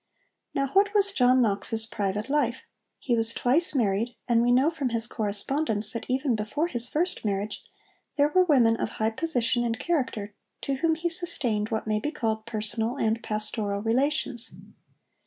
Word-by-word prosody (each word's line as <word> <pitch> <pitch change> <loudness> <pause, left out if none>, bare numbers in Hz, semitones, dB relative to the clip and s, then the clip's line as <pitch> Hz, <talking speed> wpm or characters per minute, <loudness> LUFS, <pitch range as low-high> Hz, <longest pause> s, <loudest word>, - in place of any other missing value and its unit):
Now 275 -1 0
what 405 +6 +2
was 400 -1 +5
John 255 -6 +4
Knox's 220 +1 0
private 210 0 -3
life? 270 -4 0 0.3
He 245 - -1
was 225 0 +1
twice 305 +7 +3
married, 230 0 0
and 235 -1 +3
we 240 +1 +2
know 265 +6 +4
from 285 -6 -2
his 230 -1 -1
correspondence 220 +1 -1
that 230 - -5
even 260 0 0
before 215 +9 -2
his 240 -7 +2
first 350 +4 +1
marriage 205 0 -3 0.5
there 290 0 +3
were 370 +4 +4
women 245 -9 +4
of - - -2
high 220 +1 +1
position 245 -3 0
and 230 -1 -1
character 250 -11 -2 0.3
to 275 -1 -2
whom 325 +3 +1
he 335 +2 -2
sustained 275 -11 -1
what 220 -1 -2
may 215 -1 0
be 295 - -2
called 220 -7 -3
personal 225 +2 -2
and 225 -1 0
pastoral 210 -2 -2
relations. 240 -1 0
235 Hz, 170 wpm, -26 LUFS, 220-290 Hz, 0.5 s, was